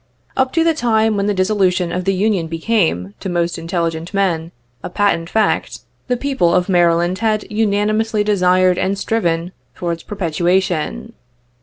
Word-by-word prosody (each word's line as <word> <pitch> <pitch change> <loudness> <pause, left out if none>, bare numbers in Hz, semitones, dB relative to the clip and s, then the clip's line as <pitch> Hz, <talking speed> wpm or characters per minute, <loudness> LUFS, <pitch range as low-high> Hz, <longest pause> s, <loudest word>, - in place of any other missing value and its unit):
Up 265 -1 +1
to 330 - +3
the 330 0 +3
time 225 -6 +1
when 200 0 0
the 205 - +1
dissolution 185 -2 +1
of 180 +1 -3
the 195 - +2
Union 195 -3 0
became, 165 - 0
to 190 - -5
most 175 -1 -1
intelligent 165 +1 -3
men, 170 -4 0 0.3
a - - -6
patent 175 -3 0
fact, 220 -1 0 0.3
the 250 -1 0
people 255 -11 +1
of 180 -1 +2
Maryland 175 0 +2
had 215 -1 0
unanimously 215 0 +1
desired 185 -3 +3
and 195 +1 0
striven 175 -5 -1 0.2
for 175 -1 -3
its 165 -1 -4
perpetuation. 175 - -1
185 Hz, 155 wpm, -18 LUFS, 170-215 Hz, 0.3 s, to